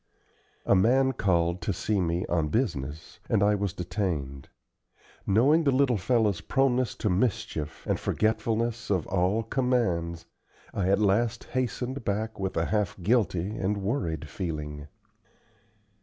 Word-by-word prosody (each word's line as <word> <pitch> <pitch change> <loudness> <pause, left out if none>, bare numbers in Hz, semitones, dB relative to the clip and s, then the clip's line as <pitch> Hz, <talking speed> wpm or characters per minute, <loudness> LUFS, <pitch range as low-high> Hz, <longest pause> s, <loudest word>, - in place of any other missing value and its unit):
A - - +4
man 130 +8 +4
called 85 -5 +1
to 105 - -1
see 100 +1 0
me 85 +1 0
on 85 -3 0
business, 75 - -3
and 100 - +3
I 105 +1 +4
was 100 -2 -1
detained. 80 -8 -3 0.8
Knowing 135 +11 +4
the 145 - +3
little 130 -2 +3
fellow's 105 -2 +1
proneness 130 -2 +1
to 105 - -1
mischief, 90 -7 -2
and - - 0
forgetfulness 115 +1 0
of 95 -6 +1
all 95 +4 +1
commands, 110 -10 0 0.5
I 95 -2 0
at 100 - +4
last 105 +2 +1
hastened 130 +1 -3
back 110 +2 -2
with 95 -2 -2
a 80 - +2
half 105 -2 -1
guilty 100 -2 +1
and 100 +2 0
worried 95 - -2
feeling. 75 -4 -5
100 Hz, 135 wpm, -27 LUFS, 85-120 Hz, 0.8 s, A